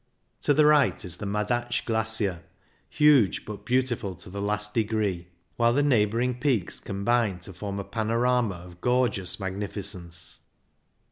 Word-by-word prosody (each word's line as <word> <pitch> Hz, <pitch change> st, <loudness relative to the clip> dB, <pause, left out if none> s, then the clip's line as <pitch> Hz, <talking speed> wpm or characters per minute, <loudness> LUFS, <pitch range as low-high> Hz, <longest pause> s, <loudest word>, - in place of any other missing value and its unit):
To 145 Hz, -, +2 dB
the 150 Hz, -, +5 dB
right 150 Hz, -7 st, +4 dB
is 90 Hz, -1 st, -3 dB
the 105 Hz, -, -5 dB
Madatsch 120 Hz, +4 st, -1 dB
Glacier, 110 Hz, -5 st, 0 dB, 0.5 s
huge 145 Hz, -9 st, +4 dB
but 105 Hz, -1 st, -8 dB
beautiful 125 Hz, -6 st, 0 dB
to 90 Hz, -, -10 dB
the 100 Hz, +1 st, -5 dB
last 105 Hz, +1 st, -2 dB
degree, 105 Hz, -6 st, -1 dB, 0.3 s
while 115 Hz, 0 st, +3 dB
the 145 Hz, +3 st, +2 dB
neighbouring 120 Hz, -1 st, +2 dB
24 -, -, -20 dB
CYCLING 140 Hz, -2 st, +3 dB
IN -, -, +2 dB
THE 90 Hz, -, -7 dB
ALPS -, -, -10 dB
peaks -, -, -7 dB
combine 100 Hz, -1 st, 0 dB
to 95 Hz, -, -8 dB
form 100 Hz, +2 st, -5 dB
a -, -, -3 dB
panorama 115 Hz, +1 st, 0 dB
of 90 Hz, 0 st, -13 dB
gorgeous 125 Hz, -7 st, +1 dB
magnificence. 95 Hz, -3 st, -3 dB
105 Hz, 165 wpm, -26 LUFS, 100-120 Hz, 0.5 s, the